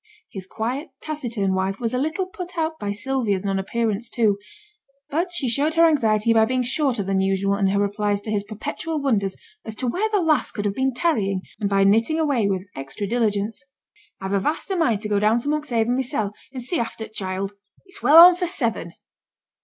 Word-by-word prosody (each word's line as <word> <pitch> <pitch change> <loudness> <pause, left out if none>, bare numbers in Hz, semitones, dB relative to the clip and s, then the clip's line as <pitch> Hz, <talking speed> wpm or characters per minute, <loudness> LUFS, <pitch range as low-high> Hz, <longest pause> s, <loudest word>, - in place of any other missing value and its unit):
His 190 -2 -8
quiet, 250 - -3
taciturn 235 -11 -2
wife 190 +1 -1
was 235 -1 -2
a 250 - 0
little 315 +7 -1
put 360 -2 -9
out 320 0 -1
by 205 -1 -2
Sylvia's 205 -3 -1
non 195 -1 0
appearance 225 +2 -1
too; 210 -4 +1 0.7
but 340 +5 0
she 330 -7 -1
showed 285 +7 +1
her 335 0 +6
anxiety 230 -8 +3
by 225 -1 +5
being 255 +2 0
shorter 255 -3 0
than 195 0 0
usual 195 +1 +1
in 200 -1 +1
her 200 +1 +1
replies 205 0 0
to 215 - -4
his 205 -2 0
perpetual 295 - -4
wonders 210 -9 0 0.3
as 220 - -7
to 255 - -3
where 375 - 0
the 420 -2 +2
lass 310 -8 +2
could 205 - -5
have 200 - 0
been 265 +4 0
tarrying, 225 - 0 0.2
and 205 - -1
by 195 -1 +3
knitting 225 +10 +3
away 280 -9 +1
with 190 -1 -2
extra 135 +9 -5
diligence. 210 -2 -1 0.6
'I've 190 0 -4
a 200 - +3
vast 300 - -2
o' - - +1
mind 235 - +1
to 215 - -3
go 205 -1 +1
down 215 +2 +3
to 240 - -4
Monkshaven 245 -6 0
mysen, 250 -5 -1 0.2
and 255 -2 -7
see 330 +8 -1
after 230 -1 -4
t' 215 - -17
child. 195 -1 -3 0.3
It's 395 +1 -11
well 305 - +6
on 350 +2 +11
for 355 0 -2
seven.' 230 - -2
230 Hz, 210 wpm, -23 LUFS, 200-295 Hz, 0.7 s, on